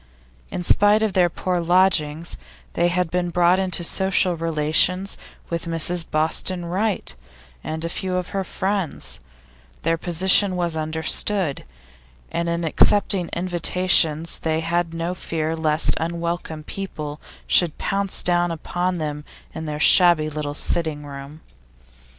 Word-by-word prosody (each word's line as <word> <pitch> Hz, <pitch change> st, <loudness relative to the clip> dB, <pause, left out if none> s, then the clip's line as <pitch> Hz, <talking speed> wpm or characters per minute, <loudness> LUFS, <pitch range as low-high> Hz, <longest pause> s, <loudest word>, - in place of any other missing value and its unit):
In 180 Hz, -, -5 dB
spite 205 Hz, +4 st, +4 dB
of 215 Hz, -3 st, 0 dB
their 180 Hz, -2 st, +3 dB
poor 180 Hz, +1 st, -2 dB
lodgings, 170 Hz, -2 st, +1 dB, 0.4 s
they 175 Hz, -, +2 dB
had 175 Hz, -1 st, -1 dB
been 175 Hz, 0 st, -1 dB
brought 175 Hz, +2 st, +3 dB
into 185 Hz, -2 st, +1 dB
social 185 Hz, 0 st, +3 dB
relations 165 Hz, +4 st, +1 dB, 0.4 s
with 170 Hz, -1 st, -3 dB
Mrs 170 Hz, +1 st, +2 dB
Boston 165 Hz, +3 st, -1 dB
Wright 190 Hz, -, -2 dB, 0.5 s
and 160 Hz, +1 st, -4 dB
a -, -, -1 dB
few 185 Hz, +2 st, -3 dB
of 180 Hz, -1 st, -3 dB
her 195 Hz, -1 st, -2 dB
friends; 190 Hz, -, -3 dB, 0.6 s
their 165 Hz, 0 st, 0 dB
position 185 Hz, +3 st, +3 dB
was 175 Hz, -2 st, -1 dB
understood, 160 Hz, +2 st, 0 dB, 0.7 s
and 170 Hz, 0 st, -2 dB
in 170 Hz, 0 st, -2 dB
accepting 190 Hz, +2 st, +3 dB
invitations 170 Hz, -2 st, +1 dB
they 160 Hz, 0 st, -1 dB
had 170 Hz, +1 st, -1 dB
no 165 Hz, +2 st, -2 dB
fear 160 Hz, -2 st, -3 dB
lest 155 Hz, -1 st, +2 dB
unwelcome 170 Hz, -1 st, -4 dB
people 155 Hz, -6 st, -7 dB, 0.2 s
should 175 Hz, -4 st, +3 dB
pounce 195 Hz, -1 st, -1 dB
down 175 Hz, 0 st, +2 dB
upon 175 Hz, +2 st, -3 dB
them 150 Hz, -2 st, -4 dB, 0.3 s
in 160 Hz, 0 st, -6 dB
their 150 Hz, 0 st, -4 dB
shabby 170 Hz, -2 st, +6 dB
little 145 Hz, -1 st, -4 dB
sitting 155 Hz, -2 st, -2 dB
room. 140 Hz, +2 st, -10 dB
170 Hz, 135 wpm, -22 LUFS, 160-180 Hz, 0.7 s, shabby